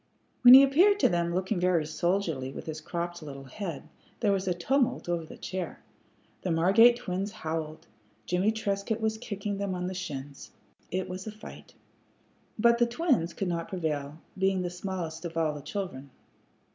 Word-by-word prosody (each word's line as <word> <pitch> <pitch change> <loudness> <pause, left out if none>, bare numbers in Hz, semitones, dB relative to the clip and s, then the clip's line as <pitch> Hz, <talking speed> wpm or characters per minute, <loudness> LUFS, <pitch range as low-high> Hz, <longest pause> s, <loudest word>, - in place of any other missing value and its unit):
When 250 0 +11
he 270 - +10
appeared 360 +10 +5
to - - +5
them 170 -1 0
looking 185 +2 -1
very 175 -3 +2
soldierly 160 -4 -1
with - - -8
his 155 -1 -5
cropped 175 +1 -4
little 140 -3 -8
head, 165 +4 -6 0.3
there 210 -4 +2
was 195 -1 -1
a 180 - +2
tumult 255 +7 0
over 170 -1 -1
the - - -11
chair. 185 -2 -5 0.6
The 185 - -3
Margate 195 +9 +5
twins 195 -2 -3
howled; 160 -2 -5 0.4
Jimmie 185 +4 +2
Trescott 210 0 -2
was 220 0 -1
kicking 205 -3 -4
them 200 -2 -2
on 180 0 -3
the 185 - -3
shins. 145 -6 -6 0.4
It 185 +1 -2
was 185 +3 -6
a - - -3
fight. 215 +1 -12 0.8
But 235 +2 +4
the 240 - +4
twins 240 - +1
could 195 - -2
not 170 -1 -2
prevail, 150 -5 -3 0.2
being 190 -1 +1
the 175 - -3
smallest 175 -3 -5
of 165 -1 -5
all 160 -2 +1
the 145 - -7
children. 140 -6 -5
180 Hz, 175 wpm, -28 LUFS, 165-205 Hz, 0.8 s, When